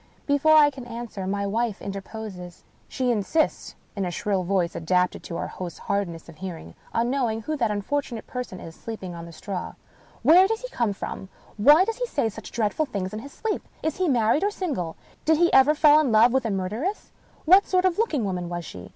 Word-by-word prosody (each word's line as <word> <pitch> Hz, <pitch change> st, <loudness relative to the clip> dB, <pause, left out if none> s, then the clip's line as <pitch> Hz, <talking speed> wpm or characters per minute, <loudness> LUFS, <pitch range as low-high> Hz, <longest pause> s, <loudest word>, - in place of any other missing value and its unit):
Before 285 Hz, +2 st, +4 dB
I 295 Hz, -1 st, +7 dB
can 265 Hz, -3 st, -9 dB
answer, 230 Hz, -5 st, -6 dB
my 200 Hz, +1 st, -1 dB
wife 220 Hz, +1 st, -1 dB
interposes. 195 Hz, -3 st, -7 dB, 0.2 s
She 255 Hz, -1 st, 0 dB
insists 240 Hz, +9 st, 0 dB, 0.2 s
(in 200 Hz, -, -2 dB
a 180 Hz, -, -1 dB
shrill 195 Hz, +2 st, -1 dB
voice, 180 Hz, -2 st, 0 dB
adapted 180 Hz, +2 st, +1 dB
to 170 Hz, -, -5 dB
our -, -, -2 dB
host's 175 Hz, -3 st, -7 dB
hardness 180 Hz, -5 st, -3 dB
of 165 Hz, -2 st, -13 dB
hearing) 170 Hz, -, -7 dB, 0.2 s
on 235 Hz, +2 st, 0 dB
knowing 235 Hz, -5 st, 0 dB
who 310 Hz, -, -2 dB
that 230 Hz, -5 st, +1 dB
unfortunate 225 Hz, +3 st, -2 dB
person 250 Hz, -7 st, -6 dB
is 165 Hz, -, -9 dB
sleeping 195 Hz, -3 st, -7 dB
on 170 Hz, 0 st, -8 dB
the -, -, -10 dB
straw. 180 Hz, +3 st, -6 dB, 0.5 s
"Where 360 Hz, +4 st, +7 dB
does 445 Hz, +1 st, -2 dB
he -, -, -6 dB
come 235 Hz, -, 0 dB
from? 190 Hz, 0 st, -6 dB, 0.3 s
Why 295 Hz, -, +7 dB
does 455 Hz, +1 st, -3 dB
he -, -, -2 dB
say 280 Hz, -, 0 dB
such 220 Hz, 0 st, -10 dB
dreadful 230 Hz, +7 st, 0 dB
things 195 Hz, -6 st, -4 dB
in 215 Hz, -, -4 dB
his 280 Hz, +5 st, -10 dB
sleep? 440 Hz, +6 st, -3 dB, 0.2 s
Is 315 Hz, -2 st, -1 dB
he 370 Hz, -1 st, +1 dB
married 250 Hz, -, +2 dB
or 405 Hz, -, +3 dB
single? 285 Hz, -, -3 dB, 0.3 s
Did 320 Hz, 0 st, +3 dB
he 345 Hz, +1 st, +3 dB
ever 270 Hz, +3 st, +6 dB
fall 300 Hz, 0 st, +6 dB
in 290 Hz, -6 st, +1 dB
love 225 Hz, +3 st, +5 dB
with 265 Hz, -2 st, +1 dB
a -, -, 0 dB
murderess? 215 Hz, -, -3 dB, 0.3 s
What 375 Hz, +5 st, +6 dB
sort 370 Hz, 0 st, +2 dB
of 370 Hz, -2 st, +3 dB
a 430 Hz, -, +2 dB
looking 300 Hz, -, 0 dB
woman 180 Hz, -3 st, -3 dB
was 175 Hz, -1 st, -4 dB
she 90 Hz, -8 st, -9 dB
225 Hz, 215 wpm, -25 LUFS, 190-295 Hz, 0.5 s, I